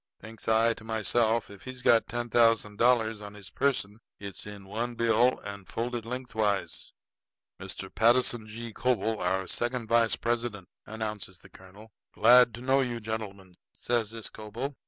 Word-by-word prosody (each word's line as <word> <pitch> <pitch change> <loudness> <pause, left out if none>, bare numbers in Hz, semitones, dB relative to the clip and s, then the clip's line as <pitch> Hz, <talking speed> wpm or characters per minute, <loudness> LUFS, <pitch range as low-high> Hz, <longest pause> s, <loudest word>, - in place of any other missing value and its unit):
Thinks 110 0 -10
I 115 +1 +4
to 115 - -14
myself, 110 0 0
if 100 - -13
he's 130 -1 -9
got 115 -1 +4
ten 120 0 -3
thousand 115 -3 +3
dollars 115 -3 +3
on 105 0 -9
his 100 -2 -12
person 115 -7 -1 0.2
it's 100 0 -8
in 100 -1 -9
one 115 +5 -3
bill 115 +2 +3
and 100 -1 -8
folded 120 -1 -4
lengthwise. 110 -5 -2 0.7
"Mr. - - -6
Patterson 120 -1 +3
G. 115 +1 -7
Coble, 115 -3 0
our 95 +1 0
second 120 +4 -2
vice 115 -1 +3
president," 115 -5 -3 0.2
announces 105 -4 -5
the - - -16
colonel. 100 +4 -15 0.2
"Glad 120 +1 +6
to 120 - -10
know 135 +2 +3
you, 120 -2 -2
gentlemen," 100 -4 -6 0.2
says 120 -3 -1
this 115 -1 -5
Coble. 115 +7 -6
115 Hz, 155 wpm, -28 LUFS, 105-120 Hz, 0.7 s, Glad